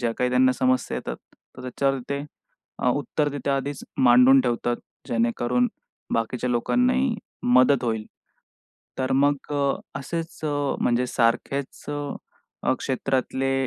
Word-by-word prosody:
ज्या 115 -2 0
काही 125 0 +1
त्यांना 130 0 +4
समस्या 130 0 +1
येतात, - - -5 0.4
तर 125 - -9
त्याच्यावर 135 +1 0
ते 140 +1 -2 0.5
अ, - - +1
उत्तर 145 +2 0
तिथे 140 0 -2
आधीच 140 +1 -2
मांडून 125 +1 +7
ठेवतात, 120 -1 0 0.3
जेणेकरून 120 - +1 0.5
बाकीच्या 120 +2 -1
लोकांनाही 250 - +2 0.3
मदत 125 +1 +4
होईल. 110 -2 -1 0.9
तर 130 0 0
मग 140 +1 +1
अ, 140 -1 +2 0.3
असेच 165 +4 -5
अ, 145 -2 0
म्हणजे 125 +1 +2
सारखेच 125 +4 -1
अ, 145 -2 -5
क्षेत्रातले 135 0 -1
130 Hz, 125 wpm, -24 LUFS, 125-145 Hz, 0.9 s, मांडून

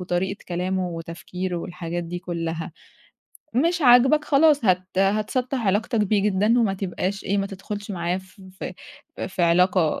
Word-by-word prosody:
وطريقة 180 +2 -2
كلامه 180 +1 -1
وتفكيره 175 +2 -5
والحاجات 175 0 -4
دي 175 +1 -5
كُلّها. 165 -2 -4 0.8
مش 335 +6 +2
عاجبك 265 +4 +6
خلاص 290 -3 +4
هت 185 0 +1
هتسطّح 215 +5 0
علاقتك 215 +4 +1
بيه 210 0 +2
جدًا 210 +4 +2
وما 200 -4 +1
تبقاش 195 +1 -3
إيه، 200 +1 0
ما 195 - 0
تدخُلش 205 +1 -7
معاه 175 -1 -1
ف 190 +1 -17 0.2
ف - - -4 0.6
في 185 -1 -2
علاقة 170 -1 +3
190 Hz, 145 wpm, -24 LUFS, 175-215 Hz, 0.8 s, عاجبك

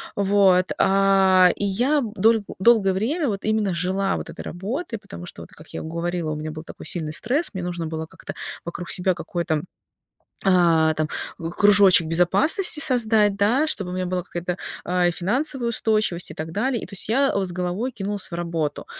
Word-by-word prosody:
вот, 195 -2 +3
а. 190 -2 +4
И 205 - -1
я 250 +10 +1
дол 225 +3 +3 0.2
долгое 200 -3 +4
время 275 - -1
вот 200 -2 -3
именно 215 -3 0
жила 190 +3 -1
вот - - -6
этой - - -8
работой, 230 - -5
потому 200 -4 -11
что, - - -10
вот, - - -13
как 155 - -14
я - - -6
говорила, 170 0 -3
у - - -3
меня 155 +1 -5
был 155 0 -8
такой - - -12
сильный 155 -3 -3
стресс, 270 - -1
мне 185 - -5
нужно 175 -1 -4
было 160 0 -5
как-то - - -10 0.3
вокруг 170 0 -7
себя 185 +1 +1
какой-то, 170 -2 -3 0.8
а, 170 -4 +4
там, 155 0 -2 0.3
к 165 0 -4
кружочек 200 -5 +6
безопасности 195 - +4
создать, 220 -8 +4
да, 225 +9 +2
чтобы 195 -11 -1
у 180 - -5
меня 185 0 -2
была 180 0 -2
какая-то, 175 0 -5 0.3
а, 180 -1 +1
финансовая 240 - -1
устойчивость 215 -6 0
и - - -8
так 160 +1 -6
далее. 235 +6 -1
И - - -5
то - - -14
есть 200 - -4
я, 275 +4 +2
э, 200 -1 0
с 180 - -5
головой 180 +8 -3
кинулась 205 -3 -5
в - - -12
работу. 165 -4 -3
190 Hz, 190 wpm, -22 LUFS, 175-215 Hz, 0.8 s, кружочек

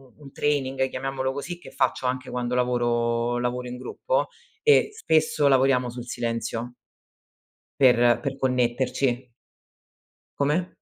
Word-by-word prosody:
u 150 - -18
un 140 - -12
training, 135 -3 0
chiamiamolo 130 0 -2
così, 155 +6 -6
che - - -12
faccio 130 - 0
anche 130 +1 -3
quando 125 0 -2
lavoro 120 -1 +1
lavoro 125 +1 -2
in 125 0 -6
gruppo - - -2 0.3
e 445 -2 +5
spesso 155 - +2
lavoriamo 130 -2 +3
sul 120 0 -7
silenzio 120 0 -3 1.1
per 120 -2 +5
per 135 -2 -3
connetterci. 125 0 0 1.1
Come? 150 +6 +1
130 Hz, 120 wpm, -25 LUFS, 120-135 Hz, 1.1 s, e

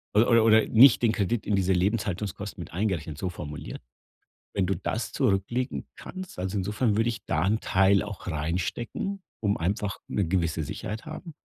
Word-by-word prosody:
oder 115 +1 +5
oder 110 0 +6
nicht 120 +2 +7
den 115 -3 +4
Kredit 110 +2 -1
in 105 - +1
diese 95 0 +2
Lebenshaltungskosten 100 0 -2
mit - - -9
eingerechnet, 85 -5 -2
so 95 - -2
formuliert. 75 -4 -7 0.7
Wenn 95 - +2
du 95 - +1
das 105 +4 -3
zurücklegen 120 +1 0
kannst, 185 - -8
also 95 +2 -2
insofern 105 +3 0
würde 115 +1 +2
ich 115 -2 -5
da 80 +2 0
'n 110 +3 +2
Teil 95 +1 +3
auch 100 -3 -7
reinstecken, 95 - -3 0.2
um 100 -1 +2
einfach 100 +4 -2
'ne 100 - 0
gewisse 85 -3 0
Sicherheit 105 +9 -5
haben, 155 0 -8
100 Hz, 165 wpm, -27 LUFS, 90-115 Hz, 0.7 s, nicht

